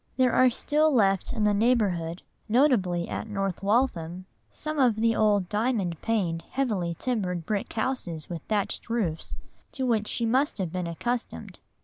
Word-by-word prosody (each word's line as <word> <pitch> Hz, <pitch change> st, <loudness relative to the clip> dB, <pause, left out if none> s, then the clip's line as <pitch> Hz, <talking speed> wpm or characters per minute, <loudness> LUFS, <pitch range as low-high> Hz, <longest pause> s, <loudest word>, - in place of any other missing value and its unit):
There 255 Hz, -2 st, +3 dB
are 255 Hz, 0 st, +6 dB
still 305 Hz, +5 st, +2 dB
left 195 Hz, -7 st, +2 dB
in 225 Hz, -4 st, -1 dB
the 210 Hz, 0 st, +3 dB
neighbourhood, 200 Hz, -7 st, +1 dB, 0.3 s
notably 210 Hz, -9 st, +2 dB
at -, -, -4 dB
North 195 Hz, -3 st, -2 dB
Waltham, 185 Hz, -5 st, 0 dB, 0.2 s
some 310 Hz, -1 st, -3 dB
of 245 Hz, -5 st, +4 dB
the 225 Hz, +1 st, +2 dB
old 205 Hz, -4 st, +2 dB
diamond 210 Hz, -5 st, -1 dB
paned, 185 Hz, -8 st, 0 dB
heavily 205 Hz, -11 st, -1 dB
timbered 185 Hz, -9 st, -2 dB
brick 205 Hz, +2 st, -2 dB
houses 220 Hz, -, -2 dB
with 170 Hz, -3 st, -5 dB
thatched 210 Hz, +1 st, -2 dB
roofs, 195 Hz, -9 st, -2 dB, 0.4 s
to 265 Hz, -3 st, -2 dB
which 220 Hz, -4 st, +1 dB
she 235 Hz, -, -1 dB
must 260 Hz, +6 st, +1 dB
have 185 Hz, -5 st, -2 dB
been 180 Hz, -1 st, -3 dB
accustomed. 240 Hz, +9 st, -4 dB
210 Hz, 155 wpm, -27 LUFS, 180-245 Hz, 0.4 s, are